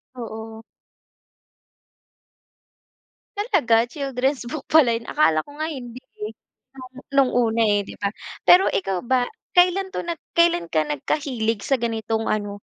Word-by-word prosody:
Oo. 225 -1 -8 2.8
Talaga? 270 - +2
Children's 270 -1 -2
book 300 -1 -6
pala 265 -7 +5
'yon, 230 - -6
akala 160 - +2
ko 285 - -14
nga 315 - -1
hindi, 250 -3 -8 0.2
eh, - - -6 0.4
lalo 255 -1 -12
na 275 - -14
no'ng 260 -2 +4
una 230 -2 +2
eh, 205 -1 +3
'di - - -10
ba? 200 - 0 0.4
Pero 370 +2 +7
ikaw 190 -1 -1
ba, 250 0 +2 0.3
kailan 365 +2 +4
'to - - -2
nag 340 -1 -4 0.2
kailan 335 - +3
ka 155 -1 +1
nagkahilig 225 - -2
sa 270 - +2
ganitong 225 -1 -2
ano, 205 -1 -2
245 Hz, 140 wpm, -23 LUFS, 220-290 Hz, 2.8 s, Pero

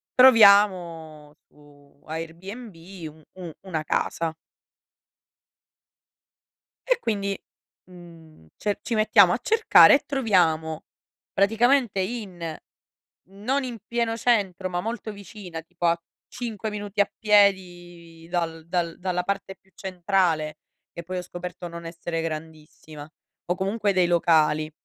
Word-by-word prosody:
troviamo 185 - +5
su 145 -1 -22
Airbnb 175 +8 -7 0.4
u 155 +1 -18
u 180 -3 -8
una 165 -5 -4
casa". 160 +1 -2 2.5
E - - +2
quindi, 200 -3 -2 0.5
mhmm, 165 - -16
ce 205 -1 -2
ci 235 - -3
mettiamo 205 -4 +5
a - - -1
cercare 445 - +6
e 280 - -1
troviamo 170 - +1 0.5
praticamente 225 +2 +2
in 185 -6 -5 0.7
non 245 +8 -2
in 245 -3 -5
pieno 235 -1 -1
centro, 195 -6 0
ma 175 0 -2
molto 225 0 -5
vicina, 195 -4 -9
tipo 175 +1 -6
a 170 0 +2 0.3
5 225 -3 -5
minuti 205 0 -2
a 205 - 0
piedi 175 -5 +1
dal 165 -2 -3
dal 170 -1 -2
dalla 180 -1 -2
parte 195 0 -3
più 190 - -33
centrale, 175 -5 -1 0.3
che 170 - -7
poi 185 +2 -5
ho - - -2
scoperto 180 0 -8
non 170 0 -9
essere 165 0 -4
grandissima, 155 -1 -8 0.4
o 180 - -1
comunque 200 +2 -1
dei 185 -2 +3
locali, 155 -3 +2
180 Hz, 120 wpm, -24 LUFS, 165-205 Hz, 2.5 s, cercare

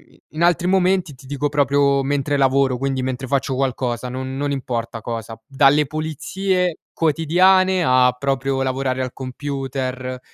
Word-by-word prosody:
i - - -26
in 155 +2 -2
altri 175 0 +3
momenti. 185 -3 +2
Ti 130 +1 -16
dico 145 +1 -1
proprio 140 -1 +2
mentre 145 +1 0
lavoro, 135 -1 +2
quindi 135 0 -1
mentre 130 +1 -3
faccio 135 0 0
qualcosa, 125 -2 -2
non 130 +1 -5
non 140 +1 -2
importa 120 -4 -3
cosa, 115 0 -5
p - - -38
dalle 140 +2 +4
pulizie 175 +5 -2 0.3
quotidiane 180 +4 +3
a 130 -3 +4
proprio 135 0 -1
lavorare 130 0 -1
al 130 -1 -3
computer, 130 -1 -4
135 Hz, 150 wpm, -20 LUFS, 130-150 Hz, 0.3 s, dalle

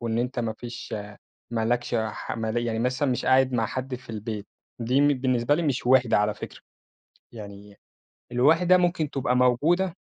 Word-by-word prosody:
وإن 115 -1 -2
أنت 125 +1 -2
ما 115 -2 -1
فيش 120 +1 -9 0.6
ما 115 -2 -1
لكش 120 +1 -1
ح 110 -1 -3
مالية، 115 +1 -2
يعني 110 -1 -2
مثلًا 130 +3 0
مش 125 - -2
قاعد 130 0 +4
مع 115 -2 +1
حد 130 0 -4
في 125 -2 -10
البيت، 110 -1 -5 0.3
دي 125 +4 +2
م 145 - +5
بالنسبة 130 -1 +1
لي 170 - -1
مش 135 -5 -1
وِحدة 125 -4 +4
على 105 0 +1
فكرة، - - -9 0.7
يعني 100 -2 -11 0.5
الوِحدة 165 +9 +4
ممكن 175 -4 0
تبقى 125 -2 0
موجودة 155 +9 +2
125 Hz, 175 wpm, -25 LUFS, 115-135 Hz, 0.7 s, م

